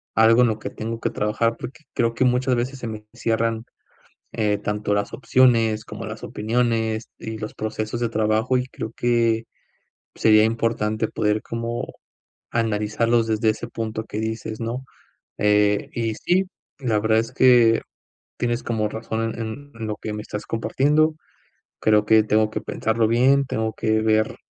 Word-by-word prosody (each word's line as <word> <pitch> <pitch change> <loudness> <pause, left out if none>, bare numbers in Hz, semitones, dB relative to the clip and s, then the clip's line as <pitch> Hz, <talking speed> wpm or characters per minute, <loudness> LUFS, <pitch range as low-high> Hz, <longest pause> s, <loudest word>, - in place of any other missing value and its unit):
algo 115 +2 +6
en 125 - +5
lo 110 -1 -1
que - - -5
tengo 115 +1 -5
que - - 0
trabajar, 110 +2 0
porque 130 +4 -8
creo 115 0 +1
que 130 - +1
muchas 125 +1 +2
veces 130 +3 -2
se 120 - -5
me 105 -1 -7
cierran, 115 -1 0 0.7
eh, 105 -2 +1
tanto 105 0 -2
las 100 0 -1
opciones, 115 -5 +3
como - - -8
las - - -7
opiniones, 110 0 -1
y 110 -1 -6
los 110 0 -5
procesos 110 +1 -3
de 120 - +1
trabajo, 110 +3 +1
y 125 - -2
creo 110 -3 -6
que 115 -2 +2 0.7
sería 110 -1 +5
importante 110 -1 0
poder 105 +1 0
como 115 0 -4 0.6
analizarlos 115 +1 +1
desde 110 0 +2
ese 115 +2 -4
punto 110 -1 -4
que 110 -1 -5
dices, 110 0 -4
¿no?, 120 +3 -3 0.5
eh, 105 0 +2
y 115 -2 -1
sí, 185 - +1 0.3
la 115 -6 +1
verdad 110 +1 +3
es 115 +2 -3
que 120 -3 +5 0.6
tienes 120 0 -1
como 110 -3 -1
razón 110 0 -3
en 115 +6 -6
en 115 -1 -5
lo 105 - -3
que 110 - -5
me 105 - -4
estás 105 - -6
compartiendo. 145 +8 +2 0.7
Creo 105 -1 +3
que 110 0 +5
tengo 110 0 +2
que 110 - -2
pensarlo 110 +1 0
bien. 130 +5 +4
Tengo 110 -3 -2
que 110 0 +1
ver 110 0 +2
110 Hz, 165 wpm, -23 LUFS, 110-120 Hz, 0.7 s, algo